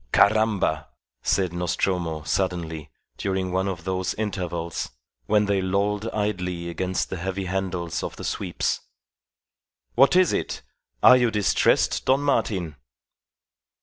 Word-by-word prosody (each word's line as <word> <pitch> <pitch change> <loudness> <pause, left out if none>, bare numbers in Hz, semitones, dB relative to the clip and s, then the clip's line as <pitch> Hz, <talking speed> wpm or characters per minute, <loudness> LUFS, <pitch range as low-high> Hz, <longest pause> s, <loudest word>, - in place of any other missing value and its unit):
"Caramba!" 100 -8 +3 0.3
said 95 -3 +1
Nostromo, 85 -2 -1
suddenly, 80 -3 -2 0.3
during 95 -1 -1
one 95 +1 0
of 90 -4 -4
those 95 0 -2
intervals 90 -5 -3 0.4
when 105 0 +3
they 100 -1 +1
lolled 100 +3 0
idly 90 -5 -2
against 95 +2 -2
the 95 - -3
heavy 95 +2 -3
handles 90 -3 -2
of - - -5
the - - -9
sweeps. - - -1 1.1
"What 135 +7 +5
is 185 -1 +5
it? - - -2 0.4
Are 125 - +9
you 120 -2 +3
distressed, 105 -3 +2
Don 135 +2 +4
Martin?" 100 - 0
95 Hz, 120 wpm, -25 LUFS, 85-105 Hz, 1.1 s, Are